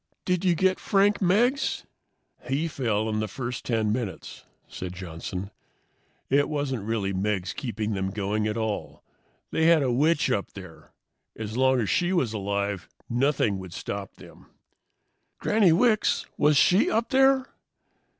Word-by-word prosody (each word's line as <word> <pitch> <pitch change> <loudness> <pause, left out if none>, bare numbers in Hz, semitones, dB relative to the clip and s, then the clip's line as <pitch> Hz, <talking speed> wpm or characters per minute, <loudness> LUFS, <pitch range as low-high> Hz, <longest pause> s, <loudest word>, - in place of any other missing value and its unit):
"Did 180 0 0
you 180 -2 +3
get 190 +2 +2
Frank 200 +1 +2
Meggs?" 235 +9 +2 0.6
"He 145 +5 0
fell 110 -8 -1
in 110 -1 -1
the 110 - -1
first 125 0 -5
10 110 -3 0
minutes," 115 -5 -5 0.2
said 90 -1 -7
Johnson. 90 +2 -6 0.8
"It 140 +2 +2
wasn't 140 -7 -2
really 105 -4 -1
Meggs 95 -1 -1
keeping 110 -4 -3
them 95 -1 -2
going 105 +2 -1
at 105 +1 -2
all. 110 -2 -4 0.5
They 160 - +2
had 165 -3 +5
a 130 - +1
witch 145 +2 +2
up 100 -5 -2
there. 95 -5 -12 0.4
As 110 0 -6
long 130 0 +3
as 105 - -2
she 175 +1 +1
was 130 - +1
alive 100 -2 -2 0.2
nothing 120 -5 +1
would 95 -2 -9
stop 100 +1 -6
them." - - -15 0.9
"Granny 210 -4 +3
Wicks! 215 +5 +2
Was 150 -1 +3
she 180 +7 +4
up 230 +1 0
there?" 265 0 +3
120 Hz, 150 wpm, -26 LUFS, 100-165 Hz, 0.9 s, had